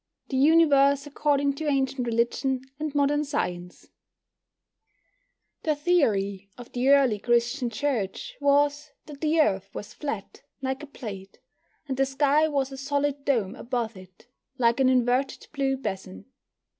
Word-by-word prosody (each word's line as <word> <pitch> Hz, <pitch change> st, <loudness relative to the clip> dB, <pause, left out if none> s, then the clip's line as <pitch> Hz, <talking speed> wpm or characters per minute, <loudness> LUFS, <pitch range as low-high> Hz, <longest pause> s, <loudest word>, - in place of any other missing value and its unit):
THE 265 Hz, -, -1 dB
UNIVERSE 280 Hz, -2 st, +5 dB
ACCORDING 285 Hz, -1 st, +1 dB
TO 305 Hz, +2 st, -5 dB
ANCIENT 270 Hz, -3 st, 0 dB
RELIGION 240 Hz, +3 st, 0 dB, 0.2 s
AND 305 Hz, -1 st, -4 dB
MODERN 290 Hz, +1 st, +2 dB
SCIENCE 180 Hz, -12 st, -4 dB, 1.7 s
The 310 Hz, -2 st, 0 dB
theory 205 Hz, -, +1 dB
of 245 Hz, -1 st, -11 dB
the 250 Hz, +2 st, 0 dB
early 270 Hz, -7 st, +4 dB
Christian 240 Hz, +3 st, +1 dB
Church 275 Hz, -, -3 dB
was 290 Hz, +1 st, +2 dB, 0.2 s
that 290 Hz, -2 st, -11 dB
the 320 Hz, +1 st, +2 dB
Earth 195 Hz, -11 st, +2 dB
was 210 Hz, +1 st, -7 dB
flat, 230 Hz, -10 st, -6 dB, 0.2 s
like 265 Hz, +1 st, -3 dB
a 300 Hz, -, -8 dB
plate, 200 Hz, -8 st, -9 dB, 0.5 s
and 265 Hz, -2 st, -3 dB
the 270 Hz, 0 st, +2 dB
sky 285 Hz, +3 st, +3 dB
was 275 Hz, -3 st, -1 dB
a 270 Hz, -, -7 dB
solid 285 Hz, +1 st, -1 dB
dome 220 Hz, -8 st, +1 dB
above 235 Hz, -3 st, -3 dB
it, 185 Hz, +2 st, -15 dB, 0.3 s
like 235 Hz, 0 st, +2 dB
an 260 Hz, -1 st, +4 dB
inverted 255 Hz, +1 st, +1 dB
blue 270 Hz, -2 st, 0 dB
basin. 190 Hz, -, -6 dB
270 Hz, 140 wpm, -26 LUFS, 235-290 Hz, 1.7 s, UNIVERSE